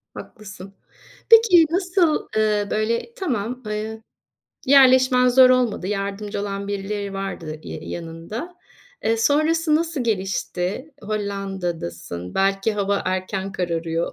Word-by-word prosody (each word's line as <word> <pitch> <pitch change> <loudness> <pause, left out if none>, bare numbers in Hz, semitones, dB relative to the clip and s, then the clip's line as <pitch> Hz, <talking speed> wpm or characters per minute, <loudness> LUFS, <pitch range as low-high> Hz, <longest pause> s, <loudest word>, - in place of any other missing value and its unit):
Haklısın. 195 -2 -10 0.6
Peki, 440 -8 +7
nasıl, 360 -2 +1
ııı, 210 -1 +1
böyle, 230 - -1
tamam, 250 - -3
ııı, 215 +1 -4 0.7
yerleşmen 255 -2 +6
zor 255 +1 +7
olmadı, 245 -7 +1
yardımcı 200 +1 -3
olan 200 0 -4
birileri 200 0 -4
vardı 170 -5 -5
ya - - -7
yanında. 170 - -7 0.5
Eee, 225 - +2
sonrası 310 +6 +2
nasıl 320 -4 -1
gelişti? 195 - -2
Hollanda'dasın 185 - -4
belki 195 +2 +1
hava 200 -1 -1
erken 190 +1 -3
kararıyor. 170 -2 -2
210 Hz, 105 wpm, -22 LUFS, 195-255 Hz, 0.7 s, Peki